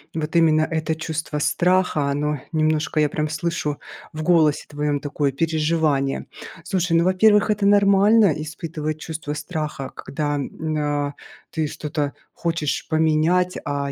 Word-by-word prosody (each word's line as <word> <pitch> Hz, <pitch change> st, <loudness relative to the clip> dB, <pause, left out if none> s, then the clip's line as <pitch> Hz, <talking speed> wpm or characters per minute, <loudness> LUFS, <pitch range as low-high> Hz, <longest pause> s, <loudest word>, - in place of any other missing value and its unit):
вот 160 Hz, +1 st, -3 dB
именно 160 Hz, -2 st, +4 dB
это 160 Hz, 0 st, -1 dB
чувство 160 Hz, -1 st, -4 dB
страха, 175 Hz, -2 st, +2 dB
оно 145 Hz, 0 st, -1 dB
немножко, 155 Hz, -1 st, +1 dB
я 150 Hz, -1 st, +3 dB
прям 150 Hz, +1 st, -2 dB
слышу 155 Hz, -2 st, -2 dB, 0.3 s
в 155 Hz, 0 st, -5 dB
голосе 155 Hz, -3 st, +3 dB
твоем, 145 Hz, -1 st, -1 dB
такое 145 Hz, -1 st, -1 dB
переживание. 155 Hz, -2 st, 0 dB, 0.4 s
Слушай, 175 Hz, -1 st, +1 dB
ну, 170 Hz, -, +4 dB
во-первых, 210 Hz, +3 st, +4 dB
это 205 Hz, -1 st, 0 dB
нормально- 200 Hz, 0 st, +5 dB
испытывать 155 Hz, 0 st, -5 dB
чувство 150 Hz, -1 st, -5 dB
страха, 150 Hz, -3 st, -4 dB
когда 145 Hz, 0 st, -3 dB
н 155 Hz, +2 st, -3 dB
а, 145 Hz, -1 st, -1 dB, 0.4 s
ты 155 Hz, -2 st, -1 dB
что-то 150 Hz, -1 st, -3 dB, 0.2 s
хочешь 165 Hz, -4 st, -2 dB
поменять, 160 Hz, +3 st, +2 dB
а 140 Hz, -1 st, -2 dB
155 Hz, 135 wpm, -22 LUFS, 150-170 Hz, 0.4 s, нормально